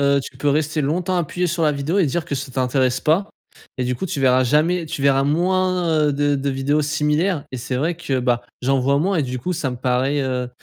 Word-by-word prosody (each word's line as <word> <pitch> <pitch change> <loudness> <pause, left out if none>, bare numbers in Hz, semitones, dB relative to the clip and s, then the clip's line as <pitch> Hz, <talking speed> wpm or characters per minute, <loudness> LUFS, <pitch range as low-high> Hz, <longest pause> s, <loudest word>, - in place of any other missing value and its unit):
Heu, 140 0 +3
tu 130 - -10
peux 145 - 0
rester 155 +2 +1
longtemps 175 +6 -1
appuyé 175 +1 -1
sur 170 0 0
la 150 - +3
vidéo 145 +7 -1
et 180 - +3
dire 165 +4 -2
que - - -4
ça 135 0 -5
t'intéresse 130 0 +1
pas 175 +7 +1 0.5
et 125 - -1
du 125 0 -1
coup 190 - -3
tu 145 - -3
verras 130 -1 +4
jamais, 160 +6 +2
tu 145 - -5
verras 135 -1 +3
moins, 175 0 +1
heu, 145 - +1
de 145 0 +1
de 140 +1 -1
vidéos 135 +3 0
similaires 150 +2 0
et 130 - -3
c'est 125 +1 -3
vrai 160 +6 -1
que 140 -6 -2
bah, 125 -1 +1 0.2
j'en 135 +2 +2
vois 140 +2 +2
moins 190 +5 +1
et 155 - +2
du 125 -1 -4
coup 180 - -2
ça 155 -6 -2
me 125 - -5
paraît, 130 +3 0
heu, 125 -2 -2
145 Hz, 250 wpm, -21 LUFS, 130-165 Hz, 0.5 s, verras